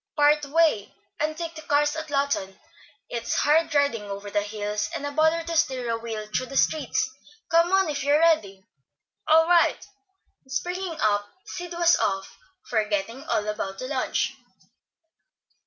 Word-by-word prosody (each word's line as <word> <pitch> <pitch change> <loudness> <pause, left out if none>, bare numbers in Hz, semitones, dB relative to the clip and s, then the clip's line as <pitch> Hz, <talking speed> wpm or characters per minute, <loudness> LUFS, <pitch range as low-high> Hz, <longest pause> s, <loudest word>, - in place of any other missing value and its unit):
"Part 295 0 +4
way, 305 -9 +2 0.2
and 310 +1 -1
take 335 -1 -4
the 315 - -9
cars 295 0 +1
at 315 -1 -5
Lawton. 275 -9 -1 0.5
It's 235 - -3
hard 315 +1 +2
riding 280 -6 +2
over 200 +1 -6
the 205 - +1
hills, 210 0 -3
and 285 - -4
a 285 - -3
bother 315 +3 +2
to 335 0 -4
steer 255 -6 +1
a 230 - 0
wheel 225 -2 -5
through 235 +4 -2
the 275 - -4
streets. 300 -5 +1 0.4
Come 335 +1 +4
on, 385 -1 +3
if 285 -2 -2
you're 285 +1 +4
ready." 215 - +2 0.6
"All 320 +1 +6
right;" 345 -1 +3 0.6
and 265 - -19
springing 350 +4 -3
up, 205 -1 +1 0.2
Sid 350 -1 -7
was 340 0 +4
off, 195 0 -2 0.3
forgetting 215 +4 -1
all 210 0 -1
about 195 -2 -3
the 255 - -5
lunch. 265 -2 -1
285 Hz, 160 wpm, -25 LUFS, 215-320 Hz, 0.6 s, All